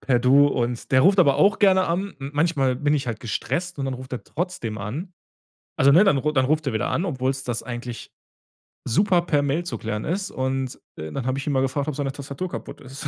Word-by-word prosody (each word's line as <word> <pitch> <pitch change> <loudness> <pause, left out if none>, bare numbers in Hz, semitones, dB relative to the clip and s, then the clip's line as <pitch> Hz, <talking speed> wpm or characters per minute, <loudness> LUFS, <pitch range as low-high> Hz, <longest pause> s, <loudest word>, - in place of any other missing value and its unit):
per 125 -3 +2
„Du“ 135 +4 +5
und 120 -1 -2
der 130 -2 +5
ruft 195 +7 +4
aber 140 -5 +4
auch 200 0 +4
gerne 190 -2 +5
an. 190 +4 -2
M 135 0 -6
manchmal 145 -5 +2
bin 145 +2 +1
ich 135 -4 -1
halt 115 -2 -4
gestresst 170 - -3
und 135 - -2
dann 135 - -2
ruft 130 +1 -10
er 125 - -5
trotzdem 140 - -4
an. 140 - -5 0.7
Also 140 +1 +6
ne? 175 +6 +7
Dann 195 -9 +4 0.2
dann 130 - +3
ruft 155 +2 0
er 135 - 0
wieder 110 - -1
an, 170 - 0
obwohl's 135 -4 -2
das 120 -1 -3
eigentlich 120 0 -7 0.8
super 180 - +3
per 150 -4 +1
Mail 145 +5 0
zu 175 - -5
klären 110 -1 -4
ist 190 +4 -2
und, 130 0 -3 0.2
äh, 80 0 -7
dann 130 - -4
hab 130 +1 0
ich 140 - -5
ihn 145 - +1
mal 130 - +2
gefragt, 140 +2 -1
ob 150 - -2
seine 140 -2 -2
Tastatur 140 +5 -6
kaputt - - -8
ist. 135 +2 -7
140 Hz, 235 wpm, -23 LUFS, 130-165 Hz, 0.8 s, ne